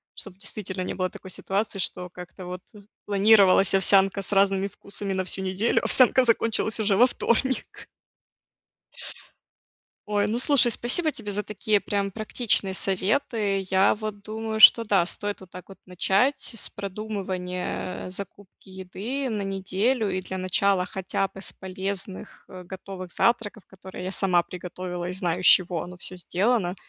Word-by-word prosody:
Чтобы 195 -2 -5
действительно 190 -2 -4
не - - -4
было 185 0 -2
такой 190 - -12
ситуации, 195 +2 -2
что 180 -1 -2
как-то 180 +1 -11
вот, 180 0 -7
э, 205 -1 -14 0.2
планировалась 200 -2 +5
овсянка 195 +1 +4
с 195 - -7
разными 195 -1 +2
вкусами 200 0 -4
на 190 0 -2
всю 190 - -2
неделю, 190 +5 +1
а - - -18
овсянка 255 0 +5
закончилась 230 -1 +1
уже 210 -2 +2
во 245 +5 +6
вторник. 260 +2 -2 2.2
Ой, 205 -1 +1
ну, 225 +3 -1
слушай, 260 -3 +3
спасибо 305 +9 +2
тебе 210 -6 -7
за 205 +1 -2
такие 210 0 0
прям 200 0 -2
практичные 215 -2 -1
советы. 200 +2 0
Я 190 +1 +4
вот 210 -1 -6
думаю, 220 +1 -5
что 230 +1 +9
да, 200 -5 +2
стоит 205 +3 -4
вот 185 - -14
так 180 +1 -11
вот 195 - -12
начать 195 +8 +2
с 230 - -2
продумывания, 190 -3 -5
э, - - -7
закупки 195 +1 -9
еды 200 +9 -5
на 210 -3 -2
неделю, 195 +4 -1
и 185 0 -2
для 190 0 -6
начала 185 0 +1
хотя 190 +1 -2
бы 195 - -13
с 195 - -1
полезных, 190 0 -5
э, 185 -1 -10
готовых 185 0 -9
завтраков, 225 -3 0
которые 190 -1 -10
я 185 - -4
сама 185 -3 +2
приготовила 180 0 -6
и - - -3
знаю, 180 -2 -2
из - - -3
чего 175 -3 +5
оно 180 0 -10
всё 185 - -5
сделано. 185 +1 0
195 Hz, 160 wpm, -25 LUFS, 185-215 Hz, 2.2 s, что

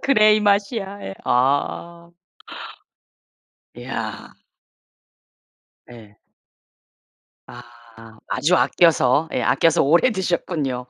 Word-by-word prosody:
그래 215 -6 +4
이 - - -1
맛이야 200 0 -1
예 95 - -7
아. 145 +7 -1 1.7
이야. - - -7 1.6
예. 105 -3 -16 1.3
아 115 -2 -16
아주 180 +5 0
아껴서 160 -2 +2
예 - - -1
아껴서 165 -2 +2
오래 170 - +3
드셨군요. 165 - -3
165 Hz, 150 characters per minute, -20 LUFS, 125-195 Hz, 1.7 s, 그래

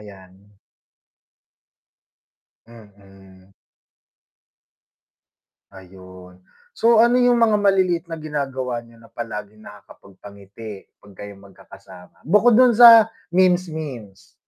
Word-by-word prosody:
Ayan. 95 -3 -16 2.3
Mm. 95 -4 -20 2.2
Ayun. 95 -1 -16 0.3
So, 230 - +1
ano 245 +1 +1
'yung 245 0 +2
mga 225 -3 +1
maliliit 185 -4 0
na 165 - -7
ginagawa 135 -5 -6
niyo 115 0 -21
na 115 0 -21
palaging 110 -2 -9
nakakapagpangiti 100 0 -15
'pag 100 - -20
kayo 100 +1 -12
magkakasama? 95 -2 -19
Bukod 210 - +2
do'n 255 -1 +4
sa 230 -1 +6 0.2
memes-memes. 160 - -3
115 Hz, 85 wpm, -19 LUFS, -, 2.3 s, sa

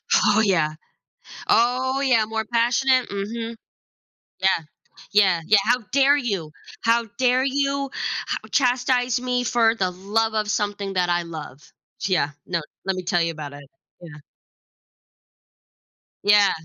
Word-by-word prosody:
Oh 210 0 +4
yeah, 165 -7 +2 0.7
oh 255 +3 +2
yeah, 240 -5 +3
more 220 0 -3
passionate, 245 +3 +2
mhm. 225 +3 -4 0.9
Yeah, 190 -2 +2 0.5
yeah, 190 -5 +4
yeah, 210 - +5
how 245 +3 +3
dare 280 +1 +5
you, 200 - -3 0.3
how 230 0 +2
dare 255 0 +3
you 275 0 -1 0.5
h - - -14
chastise 250 -1 +1
me 250 -1 -1
for 230 -1 +3
the 190 -5 -1
love 215 +5 -1
of 215 -1 -1
something 205 -1 -2
that 180 -1 +1
I 175 0 +1
love, 160 -5 -9 0.5
yeah, 180 -6 +1 0.2
no, 170 -2 -1 0.2
let 190 -1 -1
me 185 - -4
tell 175 -1 0
you 165 0 -1
about 150 -2 -8
it, 145 -1 -12 0.3
yeah. 160 -4 -11 2.1
Yeah. 205 0 +5
220 Hz, 135 wpm, -23 LUFS, 185-245 Hz, 2.1 s, yeah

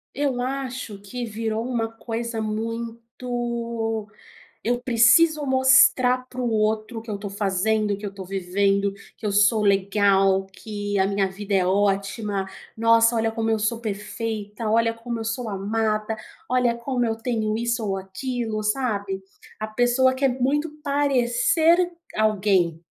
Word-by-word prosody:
Eu 275 -3 0
acho 255 -5 -4
que 240 +5 -6
virou 225 +1 -3
uma 230 -3 -1
coisa 230 0 -5
muito: 230 0 -3 0.6
eu 245 +1 0
preciso 270 +6 +4
mostrar 260 -1 +5
para 255 0 -6
o 240 - 0
outro, 215 +1 0
que 225 -1 -8
eu 200 - -3
tô 200 -1 -5
fazendo, 205 +1 0
que 205 - -13
eu 200 - -4
tô 190 -2 -8
vivendo, 195 +1 +1 0.2
que - - -29
eu 205 - +1
sou 210 +2 +4
legal, 195 -1 +3
que 205 0 -5
a 190 - +3
minha 195 -1 0
vida 200 +1 -5
é 190 -2 +4
ótima, 200 +1 0 0.3
nossa 230 +1 +4
olha 225 0 +1
como 225 0 -1
eu 220 - +1
sou 225 +2 0
perfeita, 215 0 -4
olha 230 +1 +2
como 230 0 -5
eu - - -4
sou 230 +1 -3
amada, 215 +2 -1 0.3
olha 250 -2 +2
como 245 0 -1
eu 225 -1 0
tenho 225 -2 -1
isso 235 -1 -1
ou 195 - 0
aquilo, 215 +3 -4
sabe, 205 -5 -1 0.4
a 215 - -3
pessoa 245 +3 +2
quer 270 0 +2
muito 295 +4 +1
parecer 285 +5 +2 0.3
alguém. 195 -6 +2
225 Hz, 145 wpm, -24 LUFS, 205-245 Hz, 0.6 s, mostrar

